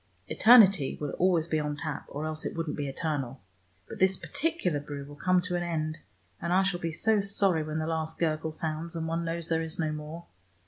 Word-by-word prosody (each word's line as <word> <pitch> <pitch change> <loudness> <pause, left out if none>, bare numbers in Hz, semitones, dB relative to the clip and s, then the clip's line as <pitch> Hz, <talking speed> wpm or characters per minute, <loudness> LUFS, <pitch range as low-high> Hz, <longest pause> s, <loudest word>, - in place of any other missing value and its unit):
Eternity 200 - +6
will 145 -1 -3
always 175 -3 +3
be 155 -2 0
on 150 -1 -2
tap, 150 -1 -4
or 145 +2 -5
else 155 0 -3
it - - -4
wouldn't 165 -2 -2
be 145 -1 -3
eternal. 135 -3 -3 0.5
But - - -9
this 190 0 +3
particular 300 - -1
brew 145 -1 -7
will 145 +1 -11
come 185 +4 +2
to 180 0 -3
an 175 - 0
end, 155 -2 -2 0.4
and 170 - -2
I 190 +2 +4
shall 190 -2 0
be 165 -1 -2
so 215 +6 +2
sorry 195 -4 +2
when 155 0 -4
the 155 - -1
last 160 -1 -2
gurgle 160 -1 0
sounds, 160 +1 -4
and 160 -1 -3
one 165 +1 -1
knows 165 0 -3
there 165 -1 +1
is 160 0 -4
no 155 -2 0
more. 155 +3 -7
160 Hz, 220 wpm, -29 LUFS, 155-175 Hz, 0.5 s, Eternity